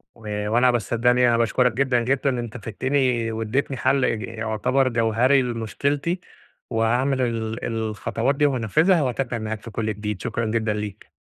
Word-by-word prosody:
و 105 -2 -4
وأنا، 120 +3 +4
بس 120 -4 -2
صدقني 125 +1 +3
أنا 115 - +3
باشكرك 120 +2 +2
جدًا، 130 0 +2
جدًا. 135 +3 +1
أنت 120 -3 -3
فدّتني 125 +1 0
وادّيتني 115 +5 -2
حل 135 +1 +2
إج 110 - -1
يعتبر 115 +3 0
جوهَري 120 +3 +3
لمشكلتي 140 - -2 0.5
وهاعمل 125 +4 +1
ال 115 -2 -2
الخطوات 115 +3 -1
دي 145 +1 +2
وهانفِّذها 145 - +3
وهاتابع 125 -1 -2
معاك 110 -1 -4
في 115 - -9
كل 110 0 -2
جديد، 105 -1 -5
شكرًا 115 -1 -2
جدًا 110 -1 0
ليك. 105 -1 -6
115 Hz, 155 wpm, -23 LUFS, 110-130 Hz, 0.5 s, وأنا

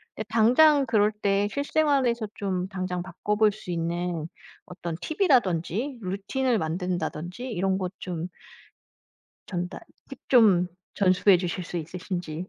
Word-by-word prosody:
네. 220 - -4
당장 270 +6 +5
그럴 215 -3 +3
때 205 -1 +1
실생활에서 280 -6 +1
좀 185 -2 -2
당장 185 -2 -3
바꿔볼 210 +4 +1
수 205 -3 -8
있는 170 -1 -2 0.4
어떤 175 -2 -6
팁이라든지 245 - +1
루틴을 215 +7 -1
만든다든지 180 +4 -3
이런 190 -1 0
것 185 -2 -3
좀 175 -2 -4 1.2
전달 180 -1 -4 0.3
팁 270 - -9
좀 205 -8 +5 0.3
전수해 190 0 +4
주실 180 0 -3
수 175 - -5
있으신지. 175 0 -5
190 Hz, 255 characters per minute, -26 LUFS, 175-230 Hz, 1.2 s, 당장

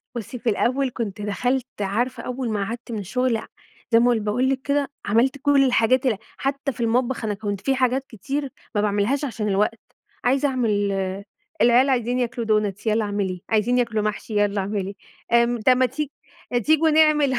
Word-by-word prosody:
بُصّي، 235 +2 -6
في 235 - 0
الأول 255 +5 +1
كنت 210 -3 -4
دخلت 245 +5 -1 0.2
عارفة 230 +5 -1
أول 250 -1 -3
ما 205 -2 -1
قعدت 235 +3 -6
من 220 - -3
الشغل، 240 +4 0
ع - - -7 0.5
زي 230 - +6
ما 245 +1 +4
باقول 225 +4 0
لِك 265 -1 0
كده، 280 0 0 0.2
عملت 240 +7 +2
كل 285 -1 +4
الحاجات 255 +1 +3
ال 230 -6 +2 0.2
حتى 275 +1 -2
في 240 - -8
المطبخ، 240 +2 0
أنا 210 - 0
كنت 205 -1 -4
في 270 - +1
حاجات 260 +1 +1
كتير 270 +6 -4 0.3
ما 205 - +3
باعملهاش 210 +8 +1
عشان 225 -5 -3
الوقت، 210 +3 +1 0.4
عايزة 270 +3 +2
أعمل 250 -4 0 0.9
العيال 245 +4 +5
عايزين 245 -1 +1
ياكلوا 240 -1 -2
دونتس، 210 -1 0
يالّا 220 +1 +2
اعمليه، 200 -3 -2
عايزين 225 +3 +2
ياكلوا 225 -3 0
محشي، 215 +1 -3
يالّا 205 -1 +2
اعملي، 195 0 -3 0.4
آمم، 235 0 +3
طب 255 +3 +5
ما 255 - +4
تي 285 +4 -3 0.5
تيجوا 315 +1 +4
نعمل 300 -3 +4
240 Hz, 180 wpm, -23 LUFS, 210-260 Hz, 0.9 s, زي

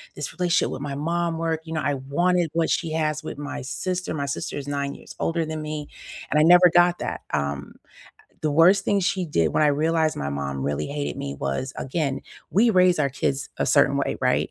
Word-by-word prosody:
this 150 - -5
relationship 175 -1 +1
with 135 - -5
my 140 -1 -4
mom 170 +2 -1
work." 165 -1 -1
You 160 - -6
know, 155 - -1
I 145 - 0
wanted 170 +5 0
what 165 -1 +1
she 165 -3 -1
has 155 -1 0
with 155 - -6
my 145 0 -5
sister. 180 +7 -3
My 140 -2 -2
sister 140 - -4
is 140 - -5
9 140 -1 -2
years - - -12
older 165 -1 0
than 155 0 -4
me, 150 -1 -5 0.4
and 150 - +3
I - - +5
never 175 +1 +7
got 175 0 +4
that. - - -3
Um, 70 0 -2
eh, - - -23 0.6
the 155 - +1
worst 180 +6 +5
thing 200 - +2
she 190 0 0
did 85 - +1
when - - +3
I 150 - +5
realized 160 +2 +1
my 70 - -3
mom 70 -1 -3
really 70 +2 -2
hated 145 0 -4
me 70 0 -4
was, 70 - -2
again, 140 -1 -2 0.3
we 220 +5 +4
raise 180 -2 +4
our 140 - +2
kids 140 +1 -2
a - - +1
certain - - +4
way, - - -1
right? - - +1
155 Hz, 225 wpm, -24 LUFS, 140-170 Hz, 0.6 s, never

